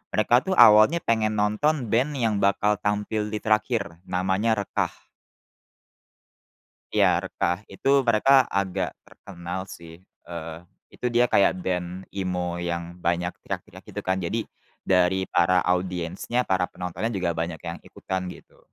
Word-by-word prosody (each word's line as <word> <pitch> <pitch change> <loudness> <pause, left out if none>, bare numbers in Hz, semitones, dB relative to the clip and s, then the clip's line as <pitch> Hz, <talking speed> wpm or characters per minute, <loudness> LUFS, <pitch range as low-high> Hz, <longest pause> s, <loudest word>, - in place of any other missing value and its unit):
Mereka 110 +3 +3
tuh 190 - +1
awalnya 110 +10 +7
pengen 110 -2 +1
nonton 115 +5 0
band 135 +6 +1
yang 110 -5 0
bakal 100 +1 +2
tampil 105 +1 -1
di 105 0 -5
terakhir, 110 -5 0
namanya 95 +5 +1
Rekah. - - -4 1.8
Ya, - - +3
Rekah. 90 +4 -2
Itu 135 0 +2
mereka 130 +4 +5
agak 95 -1 -1
terkenal 90 +2 -7
sih, 85 +1 -12 0.2
eee, 80 -1 -6 0.3
itu 125 - -4
dia 120 +1 +3
kayak 100 -5 +3
band 90 0 -3
emo 90 -2 -2
yang 85 0 -4
banyak 85 +1 0
teriak-teriak - - -7
gitu - - -6
kan, 95 0 +1
jadi, 110 +6 -2 0.4
dari 95 0 +2
para 90 +1 +3
audiensnya, 90 +6 -1
para 95 -3 0
penontonnya 90 +5 -4
juga 90 -3 0
banyak 80 0 -3
yang 85 0 -5
ikutan 95 -1 -4
gitu. - - -12
95 Hz, 135 wpm, -25 LUFS, 90-110 Hz, 1.8 s, awalnya